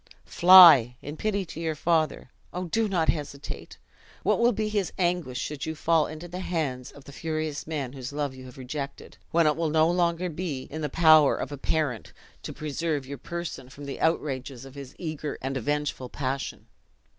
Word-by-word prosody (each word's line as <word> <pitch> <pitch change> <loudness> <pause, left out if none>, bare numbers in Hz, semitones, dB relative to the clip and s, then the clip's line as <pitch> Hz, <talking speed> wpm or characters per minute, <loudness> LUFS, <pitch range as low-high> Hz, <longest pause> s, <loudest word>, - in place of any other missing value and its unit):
"Fly, 170 -10 +8
in 145 +2 -6
pity 200 +2 -1
to 160 - -9
your 160 -2 -2
father! 155 -4 0 0.2
Oh, 180 - -4
do 225 +6 0
not 170 -4 +1
hesitate! 145 -2 -4 0.5
What - - +2
will 235 +1 +4
be 215 -1 -2
his 205 -3 -1
anguish, 175 -8 0
should 150 0 -4
you 160 - -3
fall 160 0 +2
into 155 +3 -8
the 180 +1 -7
hands 150 -9 -3
of 140 - -15
the 140 - -12
furious 155 0 -4
man 140 -5 -3
whose 130 -2 -7
love 145 -2 -2
you 130 0 -11
have 125 0 -12
rejected; 140 +2 -7
when 170 0 +3
it 150 -1 +3
will 165 -1 -1
no 155 +1 +4
longer 175 0 +1
be 160 -5 -4
in 155 +2 -7
the 150 - -2
power 155 -1 +6
of - - -5
a 145 - -5
parent 140 -7 -2 0.3
to - - -6
preserve 150 -1 -3
your 140 0 -7
person 170 -4 -6
from 140 +2 -10
the 140 - -6
outrages 135 -5 -1
of 135 - -12
his 140 -2 -10
eager 155 -3 -5
and 135 +1 -4
avengeful 145 -1 -2
passion! 135 0 -4
155 Hz, 190 wpm, -26 LUFS, 140-170 Hz, 0.5 s, Fly